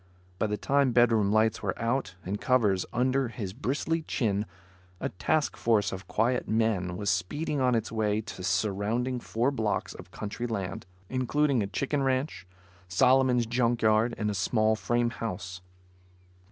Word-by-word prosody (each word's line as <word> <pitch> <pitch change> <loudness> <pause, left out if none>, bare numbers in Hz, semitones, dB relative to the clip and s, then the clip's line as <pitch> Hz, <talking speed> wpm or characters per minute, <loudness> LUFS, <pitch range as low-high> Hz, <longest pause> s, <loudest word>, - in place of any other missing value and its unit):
By 110 - +1
the 105 0 -2
time 140 0 +2
bedroom 115 -4 +4
lights 110 +1 +2
were - - -3
out 115 -5 -1
and 100 +3 -3
covers 105 -8 +2
under 130 +2 +1
his 105 -5 -6
bristly 145 +7 -1
chin, 105 -8 -1 0.5
a - - -2
task 150 - 0
force 110 -3 +2
of 95 0 -7
quiet 120 +3 0
men 105 -5 0
was 100 0 0
speeding 140 - -1
on 125 -1 +3
its 115 -1 -1
way 110 -2 0
to 105 -4 -8
surround 105 +6 0
four 120 +5 0
blocks 110 -6 -1
of - - -12
country 110 +3 -5
land; 95 -5 -4 0.2
including 130 +1 +1
a 100 - -1
chicken 140 +7 -1
ranch, 130 -5 -1 0.4
Solomon's 125 +5 +4
junk 120 0 0
yard 110 +2 +3
and 105 -1 -1
a - - -3
small 110 +2 +2
frame 120 +2 0
house. 95 -5 -5
115 Hz, 155 wpm, -28 LUFS, 105-130 Hz, 0.5 s, bedroom